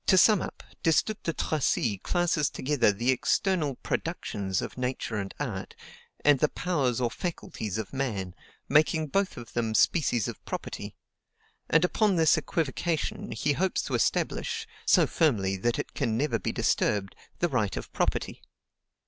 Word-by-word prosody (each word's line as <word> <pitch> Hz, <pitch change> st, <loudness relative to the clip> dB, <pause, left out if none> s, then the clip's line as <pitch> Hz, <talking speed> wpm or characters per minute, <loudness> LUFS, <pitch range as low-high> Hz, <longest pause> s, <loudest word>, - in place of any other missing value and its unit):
To 190 Hz, -, +6 dB
sum 210 Hz, +1 st, +6 dB
up: -, -, -7 dB, 0.2 s
Destutt 175 Hz, +6 st, +2 dB
de 165 Hz, -, -1 dB
Tracy 130 Hz, -, 0 dB
classes 175 Hz, -, +1 dB
together 130 Hz, -6 st, +2 dB
the 120 Hz, +6 st, +1 dB
external 150 Hz, +2 st, +1 dB
PRODUCTIONS 95 Hz, -2 st, -2 dB
of -, -, -5 dB
nature 125 Hz, -3 st, -2 dB
and 100 Hz, -1 st, -3 dB
art, 105 Hz, -10 st, -4 dB, 0.5 s
and 145 Hz, -2 st, +6 dB
the 150 Hz, -, +3 dB
POWERS 140 Hz, -10 st, 0 dB
or 120 Hz, -2 st, 0 dB
FACULTIES 115 Hz, -, -4 dB
of 110 Hz, +1 st, -5 dB
man, 105 Hz, -10 st, -2 dB, 0.3 s
making 155 Hz, +1 st, +3 dB
both 195 Hz, +4 st, 0 dB
of 115 Hz, -3 st, -9 dB
them 115 Hz, -2 st, -1 dB
species 125 Hz, -, +3 dB
of -, -, -7 dB
property; -, -, -6 dB, 0.7 s
and 165 Hz, +2 st, +5 dB
upon 205 Hz, +1 st, +2 dB
this 160 Hz, -2 st, +5 dB
equivocation 165 Hz, +1 st, -2 dB
he 145 Hz, +6 st, 0 dB
hopes 185 Hz, +5 st, 0 dB
to -, -, -5 dB
establish, -, -, 0 dB, 0.2 s
so -, -, +6 dB
firmly 105 Hz, -, +1 dB
that 115 Hz, +5 st, 0 dB
it -, -, -4 dB
can 110 Hz, -1 st, 0 dB
never 130 Hz, -3 st, 0 dB
be -, -, -2 dB
disturbed, 100 Hz, -2 st, 0 dB, 0.2 s
the 175 Hz, -, +2 dB
right 110 Hz, -, 0 dB
of -, -, -7 dB
property. -, -, -1 dB
135 Hz, 155 wpm, -28 LUFS, 110-165 Hz, 0.7 s, To